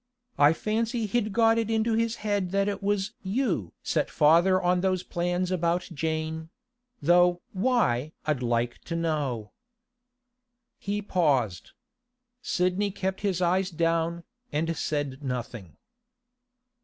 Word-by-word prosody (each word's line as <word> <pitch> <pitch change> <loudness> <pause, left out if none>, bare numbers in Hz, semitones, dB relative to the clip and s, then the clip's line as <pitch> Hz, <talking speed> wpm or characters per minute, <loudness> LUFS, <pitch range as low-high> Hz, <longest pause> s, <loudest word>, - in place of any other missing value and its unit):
I 145 +2 +7
fancy 225 +5 -1
he'd 215 0 0
got 225 +1 +4
it 225 -1 -1
into 225 0 +1
his 230 +1 +1
head 205 -3 0
that 200 0 +2
it 205 - -2
was 200 +1 0
you 190 - -1
set - - 0
father 170 +5 +4
on 180 0 +2
those 185 -1 0
plans 175 +1 -1
about 175 0 0
Jane—though 175 - 0
why 185 - +1
I'd 150 -4 0
like 120 0 0
to 165 - -4
know.' 145 -10 -2 1.3
He 205 +1 -3
paused. 135 - 0 0.7
Sidney 185 +2 0
kept 190 -1 -3
his 190 -3 0
eyes 185 +2 +2
down, 165 0 0 0.3
and 165 +2 -1
said 145 -3 -2
nothing. 120 - -5
180 Hz, 120 wpm, -27 LUFS, 155-205 Hz, 1.3 s, I